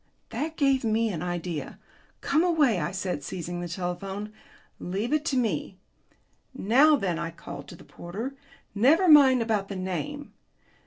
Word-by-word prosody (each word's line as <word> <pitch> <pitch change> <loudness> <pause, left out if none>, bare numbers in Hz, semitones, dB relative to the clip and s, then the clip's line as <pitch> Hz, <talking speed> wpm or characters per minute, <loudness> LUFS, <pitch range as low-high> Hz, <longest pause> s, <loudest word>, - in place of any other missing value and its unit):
That 320 +2 -4
gave 275 -3 +2
me 225 0 +1
an 165 -5 -4
idea. 175 -4 -4 0.4
"Come 310 +4 +2
away," 300 - +3
I 150 - -1
said, 190 -5 -3
seizing 175 +4 -5
the 175 - -4
telephone; 190 +4 -5 0.5
"leave 200 +9 -3
it 305 -1 +2
to 270 - 0
me. 195 - -1 0.8
Now, 265 +8 +5
then," 180 - -1
I 170 -1 -3
called 145 -4 -9
to 175 - -10
the - - -15
porter. 215 +10 -7 0.4
"Never 285 - +4
mind 270 -6 +7
about 215 -3 -1
the 200 - -6
name. 190 - -4
205 Hz, 155 wpm, -27 LUFS, 175-270 Hz, 0.8 s, mind